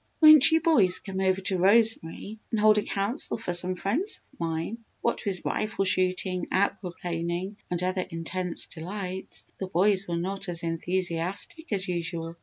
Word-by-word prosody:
"Won't 310 -3 +9
you 320 0 +4
boys 230 - +4
come 190 -2 -5
over 190 0 +1
to 185 -1 -1
Rosemary 210 0 +3
and 225 - -1
hold 215 0 +5
a - - 0
Council 205 +9 -2
for 220 -6 -4
some 180 +1 0
friends 260 - -1
of - - -25
mine?" 165 +6 -3 0.2
What 235 - -1
with 190 -3 -2
rifle 215 -2 -1
shooting, 185 -1 +1
aqua 190 -2 0
planing, 175 +3 -3
and 180 0 -2
other 185 0 -1
intense 175 +1 -3
delights, 185 +2 -6
the 190 - -3
boys 190 +2 +2
were 170 -1 -2
not 195 +2 -3
as 170 0 -3
enthusiastic 180 - -2
as 195 -2 -1
usual. 170 -1 -3
185 Hz, 165 wpm, -27 LUFS, 175-205 Hz, 0.2 s, Won't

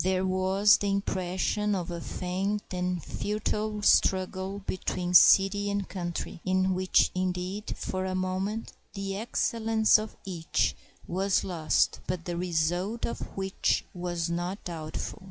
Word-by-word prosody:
There 185 0 +1
was 190 +2 +4
the 200 - -1
impression 195 +1 0
of 175 -2 -3
a 170 -1 -5
faint 190 +5 -2
and 180 -2 -2
futile 210 0 -2
struggle 190 +1 +2
between 180 -1 -2
city 195 +3 +6
and 200 -1 -1
country, 175 -2 -5
in 185 0 +2
which, 185 0 +3
indeed, 185 +2 -2
for 185 0 -3
a 185 0 -2
moment 185 +4 -2 0.2
the 195 -1 -3
excellence 220 0 +2
of 215 0 -6
each 175 -4 0 0.3
was 190 +2 +1
lost, 165 -5 +1
but 180 -2 -3
the 175 - -3
result 175 +5 -1
of - - -4 0.2
which 190 0 0
was 175 -1 -2
not 175 +4 -3
doubtful. 160 +4 -5
185 Hz, 135 wpm, -28 LUFS, 180-200 Hz, 0.3 s, city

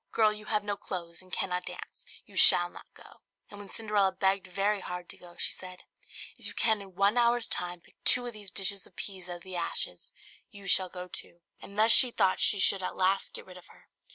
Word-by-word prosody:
Girl, 215 -2 +2
you 210 0 -10
have 210 -1 -1
no 205 0 -3
clothes 170 -4 -7
and 185 0 -16
cannot 180 -1 -2
dance, - - -9 0.2
you - - -19
shall - - +6
not - - -15
go." - - -17 0.3
And 205 - -11
when 200 -1 -11
Cinderella 210 -3 0
begged 190 0 0
very 200 +3 -1
hard 180 -1 -7
to - - -9
go, 175 -1 -15
she - - +1
said, 185 -1 -9 0.5
"If - - -7
you - - -9
can 220 -2 +2
in 190 -2 -14
one 200 +5 +2
hour's 235 0 +2
time 175 -1 -3
pick - - -27
two 245 -1 +5
of 240 - -6
these 205 -2 -10
dishes 195 0 -2
of - - -26
peas 190 -3 -7
out 175 - -5
of 175 - -13
the 185 -1 -7
ashes, 170 - -3 0.4
you 200 -2 -14
shall 185 -1 +3
go 180 0 -8
too." 170 -1 -6 0.2
And 200 - -13
thus 220 +2 +5
she 255 - +11
thought 190 -5 +1
she 205 - +3
should 195 0 +2
at 185 - -5
last 190 +1 0
get - - -9
rid 185 -1 -13
of 180 - -16
her. - - -22
195 Hz, 235 wpm, -28 LUFS, 180-210 Hz, 0.5 s, she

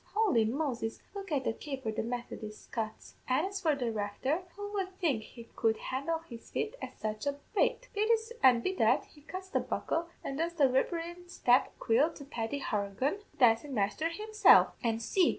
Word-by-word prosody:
Holy 405 - +4
Moses, 240 -2 -2
look 395 -3 -7
at 280 -3 +1
the 225 - 0
caper 265 -3 -4
the 215 - -2
Methodis 230 -2 -6
cuts! 220 -2 -4
An' 260 +6 +2
as 395 0 -4
for 315 -4 +3
the 245 -4 -1
Recther, 225 - -1
who 410 +1 -6
would 380 -2 -3
think 300 - +1
he 235 +2 -11
could 225 -1 +2
handle 280 +6 -2
his 235 -4 -10
feet 435 - -2
at - - -7
such 215 +4 -3
a 280 0 0 0.2
rate! - - +2
Be 420 +1 +1
this 450 0 +2
an' 245 -3 +6
be 375 - 0
that, - - +3
he 295 - -19
cuts 370 +5 -7
the - - +1
buckle, 335 +1 -1 0.2
and 275 +2 -4
does 340 +1 -1
the 305 - +2
threblin' 340 +6 -1
step 250 -7 +3
aiquil 260 +8 +3
to 280 - -9
Paddy 255 +1 -3
Horaghan, 210 - -1
the - - -26
dancin' 245 +3 +4
masther 205 +10 +1
himself? 430 +5 +5
An' 225 -1 +1
see! 345 - +3
280 Hz, 195 wpm, -32 LUFS, 230-355 Hz, 0.2 s, an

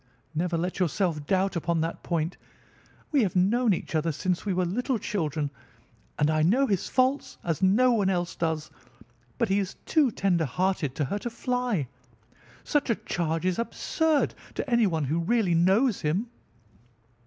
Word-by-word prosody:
Never 170 +2 0
let 175 +3 -2
yourself 165 -3 0
doubt 190 0 +1
upon 170 -1 0
that 165 +1 -3
point. 170 0 -1 0.8
We 290 -4 +4
have 200 -3 0
known 215 +6 +3
each 180 - -2
other 160 +1 +1
since 180 +6 -2
we - - +1
were 180 0 +1
little 245 +8 -1
children, 155 -9 -2 0.7
and 150 +1 +2
I 155 0 +2
know 225 - +4
his 195 -8 -1
faults 260 +2 +1
as 165 -1 -2
no 215 +7 +4
one 205 -5 +2
else 175 -2 -1
does; 160 -2 -2 0.7
but 230 - +1
he 195 +1 +3
is 195 -2 -3
too 300 -5 +3
tender 185 -6 +1
hearted 180 -2 -1
to 150 - 0
hurt 205 - -3
a - - -1
fly. 240 - -1 0.8
Such 290 -3 0
a 230 - +3
charge 165 -4 -2
is 185 +1 0
absurd 315 +5 0 0.2
to - - -3
anyone 210 - +2
who 150 +5 0
really 195 +1 +1
knows 195 +8 +3
him." 190 +11 -1
185 Hz, 165 wpm, -27 LUFS, 165-230 Hz, 0.8 s, We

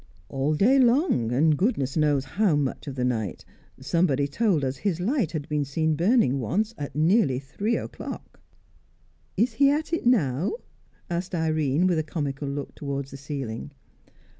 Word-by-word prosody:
"All 140 +3 0
day 250 - +4
long, 245 - +3
and 150 +5 +3
goodness 145 - 0
knows 145 -4 +2
how 195 -1 +1
much 145 -1 -2
of 135 - -5
the 125 -1 -1
night. 110 -7 -2 0.3
Somebody 145 0 +1
told 165 -2 +1
us 130 +1 -2
his 190 -5 -1
light 220 - 0
had 150 -3 -4
been 150 -1 0
seen 155 +3 0
burning 170 - +3
once 210 - -1
at 140 - -6
nearly 155 - +3
three 200 - -2
o'clock." 115 - -8 1.0
"Is 230 +4 +2
he 275 +5 +4
at 310 +3 -1
it 330 - 0
now?" 170 - +2 0.5
asked 175 +2 -3
Irene, 155 -1 +1
with 175 -3 +2
a - - 0
comical 145 -2 -4
look 140 0 -5
towards 140 -1 -5
the 140 - -8
ceiling. 135 -2 -6
150 Hz, 165 wpm, -25 LUFS, 140-200 Hz, 1.0 s, day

